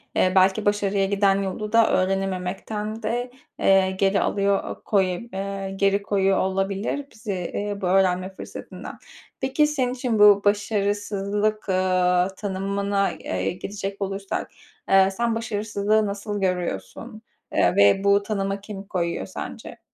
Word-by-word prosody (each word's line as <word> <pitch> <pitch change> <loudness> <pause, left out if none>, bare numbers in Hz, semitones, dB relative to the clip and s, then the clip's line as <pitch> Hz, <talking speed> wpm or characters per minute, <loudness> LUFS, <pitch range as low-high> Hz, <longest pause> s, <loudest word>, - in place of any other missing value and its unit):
eee, 185 - +3
belki 190 +3 +4
başarıya 205 -1 +1
giden 195 0 +2
yolu 205 +2 -4
da 230 -1 +5
öğrenememekten 195 +3 -2
de, 245 +3 -2 0.3
eee, 190 -1 +4
geri 195 +1 +1
alıyor, 200 0 +1
eee - - -5
koye 185 -3 +1
eee, 195 0 -4
geri 200 +1 +2
koyuyor 195 -1 +1
olabilir 195 +8 -1
bizi, 215 -2 -5
eee, 205 +3 -3
bu - - -2
öğrenme 185 0 +2
fırsatından. - - -9 0.4
Peki 300 +3 +2
senin 260 -4 -1
için 245 -3 -1
bu 205 -1 +7
başarısızlık, 205 0 0
aaa, 185 -1 +2
tanımına, 200 0 -1
eee, 95 - -3
geçecek 200 +2 -6
olursak, 195 0 -3 0.4
eee, 195 0 +5
sen 230 +3 -1
başarısızlığı 215 -1 0
nasıl 205 0 -4
görüyorsun, 180 - -3 0.3
eee, - - +3
ve 100 - +5
bu 200 0 +4
tanıma 195 -1 -2
kim 200 -1 -8
koyuyor 175 -3 -2
sence? - - -8
200 Hz, 130 wpm, -24 LUFS, 190-210 Hz, 0.4 s, bu